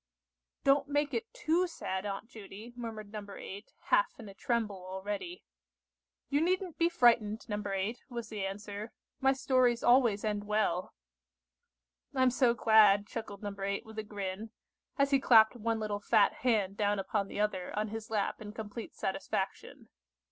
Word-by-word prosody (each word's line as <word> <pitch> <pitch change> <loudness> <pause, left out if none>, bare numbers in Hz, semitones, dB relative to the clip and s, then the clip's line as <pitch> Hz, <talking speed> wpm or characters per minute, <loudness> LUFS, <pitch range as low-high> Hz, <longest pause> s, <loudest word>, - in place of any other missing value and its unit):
"Don't 275 +1 +4
make 290 0 0
it 455 0 -3
too 360 -7 +1
sad, 190 - -4
Aunt 200 +2 -5
Judy," 220 +1 -11
murmured 220 -4 -7
No. 210 -1 -5
8, 200 +2 -9 0.2
half - - +3
in 225 - -9
a - - -10
tremble 210 -3 -2
already. 200 - -5 0.8
"You 285 +1 +1
needn't 365 0 0
be 335 0 +4
frightened, 235 -8 +3
No. 210 -2 -2
8," 200 +4 -3
was 235 -3 -6
the 210 -3 -4
answer; 205 +2 -5 0.3
"my 270 0 +4
stories 255 -3 +2
always 240 -5 +4
end 205 -1 -1
well." 210 -4 0 1.2
"I'm 260 -1 +4
so 245 -2 +3
glad," 210 -3 +6
chuckled 210 -3 -7
No. 205 -1 -3
8 200 +2 -3
with 220 0 -8
a - - -3
grin, 205 0 -5 0.5
as 280 0 +2
he 275 - +5
clapped 225 -3 +6
one 225 -1 -1
little 210 -1 -2
fat 205 0 +4
hand 210 -6 0
down 205 0 +1
upon 200 +1 -1
the - - -6
other 195 -4 -1
on 215 0 0
his 225 +1 -6
lap 210 -2 -1
in 210 -1 -8
complete 220 +1 -7
satisfaction. 190 0 -4
215 Hz, 160 wpm, -32 LUFS, 205-245 Hz, 1.2 s, glad